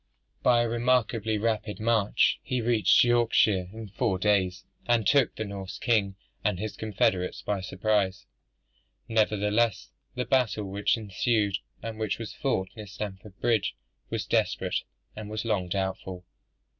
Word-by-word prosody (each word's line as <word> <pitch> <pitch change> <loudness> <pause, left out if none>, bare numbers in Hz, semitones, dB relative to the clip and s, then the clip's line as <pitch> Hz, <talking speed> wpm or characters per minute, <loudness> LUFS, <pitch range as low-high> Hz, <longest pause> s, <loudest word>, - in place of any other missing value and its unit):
By 120 -1 +4
a - - 0
remarkably 115 -2 +1
rapid, 105 -1 -1
march, 110 -2 +2
he 125 - -2
reached 115 -2 +4
Yorkshire 115 -6 +3
in 110 -1 -8
four 100 0 0
days, 95 -2 +1 0.2
and 120 -3 +3
took 140 +3 +3
the 110 - -3
Norse 100 -2 -6
king 105 -5 +1 0.3
and - - +1
his 110 +3 -4
confederates 95 -4 0
by 100 -2 -1
surprise. 95 -1 0 0.8
Nevertheless, 110 0 +1 0.2
the 125 - -2
battle 125 -6 +1
which 100 +3 0
ensued, 105 -1 0 0.2
and 115 -1 -5
which 110 -2 -1
was 115 -2 -6
fought 110 -10 -1
near 105 -2 -8
Stamford 95 0 -7
Bridge, 115 -4 +1 0.3
was - - -2
desperate, - - 0 0.4
and 105 -1 -7
was 110 +1 -4
long 95 -5 0
doubtful. 95 -1 -3
105 Hz, 140 wpm, -27 LUFS, 95-115 Hz, 0.8 s, By